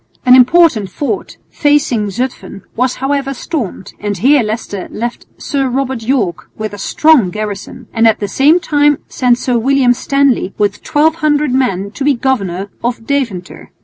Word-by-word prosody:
An 250 0 +7
important 255 - +4
fort 290 - -4
facing 285 -8 +1
Zutphen 200 -4 -5
was 255 +1 0
however 275 0 -2
stormed, 245 - -5
and 205 -1 -3
here 275 +8 +4
Leicester 215 -3 -4
left 240 +2 -5
Sir 275 -2 -2
Robert 265 -1 -2
Yorke 220 - -1
with 215 -1 -4
a 205 - -8
strong 290 - +3
garrison, 215 +4 -6
and 225 0 +3
at 220 - +2
the 205 - -2
same 290 - +3
time 295 -3 +2
sent 245 -2 +1
Sir 245 -1 0
William 260 0 +3
Stanley 270 -5 0
with 205 -1 0
1200 300 -2 +1
men 200 -7 0
to 275 - -5
be 285 0 +3
governor 200 -7 -2
of 235 -1 -3
Deventer. 230 -11 -3
250 Hz, 155 wpm, -14 LUFS, 210-280 Hz, -, An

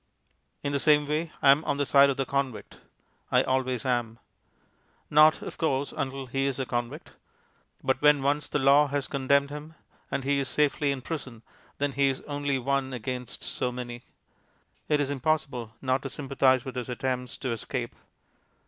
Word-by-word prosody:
In 140 - -1
the 140 - 0
same 150 0 +4
way 155 +2 -2
I 135 - +8
am 145 +3 +3
on 140 - 0
the 145 - +1
side 140 +1 +6
of 135 - -1
the 135 - 0
convict; 135 -3 -3 0.5
I - - +4
always 130 -2 -1
am. 120 -3 -1 0.9
Not, 155 +1 +6
of - - -8
course, 140 -3 0
until 135 0 -3
he 135 +2 -1
is 135 - -1
a 135 - -2
convict. 120 -1 -4 0.7
But 130 0 0
when 150 -2 +5
once 145 +2 0
the - - 0
Law 140 +1 +5
has 140 -1 -2
condemned 140 +1 +1
him, 150 +2 -8 0.3
and 135 - -2
he 140 +1 +1
is 135 - -1
safely 145 -1 +1
in 135 -2 -4
prison, 130 -8 -6 0.3
then 145 0 0
he 140 0 +2
is 135 - -3
only 145 -1 -2
one 135 +1 -1
against 125 +1 -5
so 125 - -2
many. 120 -1 -6 0.9
It 150 -1 +3
is 145 -1 0
impossible 135 -5 -1
not 130 0 +1
to 135 - -5
sympathize 135 -2 +1
with 130 - -5
his 125 0 -4
attempts 125 +1 -3
to 130 - -3
escape. 120 +1 -4
135 Hz, 180 wpm, -27 LUFS, 130-145 Hz, 0.9 s, I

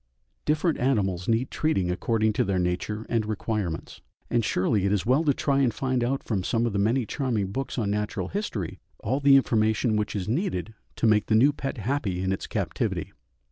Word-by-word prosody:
Different 155 +2 +1
animals 95 -9 0
need 115 +3 +1
treating 95 - 0
according 110 +3 +1
to - - +2
their 95 -1 0
nature 90 +5 -2
and 115 -2 +1
requirements, 105 -5 -3 0.3
and 120 -1 +2
surely 100 0 +1
it - - +1
is 105 -1 0
well 130 +7 +3
to 145 - +5
try 140 0 +1
and 130 -3 +3
find 130 0 -1
out 135 +3 -1
from 100 -5 -1
some 115 +4 +1
of 115 - -1
the 100 - 0
many 115 +5 +2
charming 110 -7 -1
books 135 +6 -4
on 105 -4 0
natural 105 +1 -2
history 120 - -4 0.2
all 130 +7 0
the 140 -1 +6
information 110 -3 +2
which 105 0 -2
is 100 -2 -3
needed 110 - -1 0.2
to - - -1
make 110 -1 +4
the 110 - +3
new 135 +6 +5
pet 135 -2 -4
happy 110 -6 -1
in 95 - 0
its 95 - -3
captivity. - - -2
110 Hz, 200 wpm, -26 LUFS, 100-130 Hz, 0.3 s, the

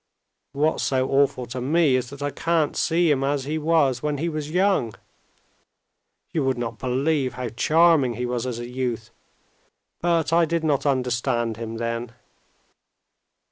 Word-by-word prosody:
"What's 150 +3 +1
so 130 -1 +1
awful 135 -2 +2
to 125 +1 -6
me 150 +1 +3
is 125 -1 -1
that 140 0 -8
I 145 - -1
can't 165 -1 0
see 170 -2 +2
him 135 -2 +1
as 140 0 0
he 155 +3 -2
was 150 -6 +2
when 150 -1 -1
he 165 +4 -1
was 155 -2 -4
young. 180 - +1 1.4
You 155 - 0
would 130 -1 0
not 115 -1 -4
believe 130 +1 0
how 125 -1 -4
charming 150 0 +3
he 125 - -3
was 120 0 -2
as 120 -2 -3
a 120 0 -6
youth, 120 -2 -4 0.9
but 165 -2 +1
I 170 0 +5
did 165 0 -1
not 150 -2 +1
understand 120 -3 0
him 115 0 -6
then." 115 0 -3
135 Hz, 160 wpm, -24 LUFS, 125-155 Hz, 1.4 s, I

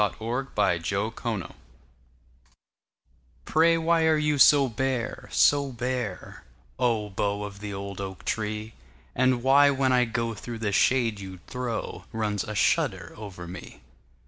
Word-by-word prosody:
The 105 - +3
Haunted 105 -7 -1
Oak 110 +3 -3 2.2
PRAY 165 +1 +4
why 165 0 +2
are 160 -1 +4
you 150 -1 +1
so 140 +1 +7
bare, 125 0 -3
so 140 -1 +3
bare, 120 -5 -4 0.4
Oh, 115 -5 0
bough 100 +1 -1
of 100 -1 -8
the 105 0 -6
old 100 0 -6
oak 95 -1 -7
tree; 110 0 -3 0.4
And 130 -1 +2
why, 140 +2 +6
when 135 -2 +2
I 125 -1 +4
go 115 0 -2
through 115 +2 -7
the 110 -2 -2
shade 115 0 +2
you 95 -1 -8
throw, 125 -2 -4
Runs 105 -2 -1
a 110 - -6
shudder 100 - +1
over 100 -5 -9
me? 90 +2 -10
115 Hz, 140 wpm, -26 LUFS, 100-130 Hz, 2.2 s, so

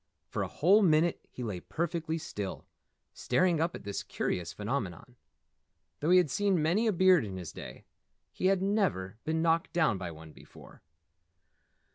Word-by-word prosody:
For - - -3
a - - -1
whole 195 +7 +4
minute 165 -2 +2
he 125 - -7
lay 105 -6 -3
perfectly 165 - -3
still, 105 -10 -6 0.5
staring 175 -3 +1
up 165 +1 0
at - - -9
this 100 0 -4
curious 90 -2 -3
phenomenon. 105 -1 -4 0.8
Though 155 - -1
he 180 - +7
had 175 -6 +3
seen 200 -3 +2
many 175 +9 +2
a - - +4
beard 185 -2 +5
in 95 -3 -6
his 90 -4 -7
day, - - -10 0.5
he 185 - -1
had 190 -1 +2
never 155 - 0
been 160 +1 0
knocked 165 0 +1
down 155 - +2
by 90 -2 -4
one 80 -1 -11
before. - - -16
160 Hz, 165 wpm, -30 LUFS, -, 0.8 s, he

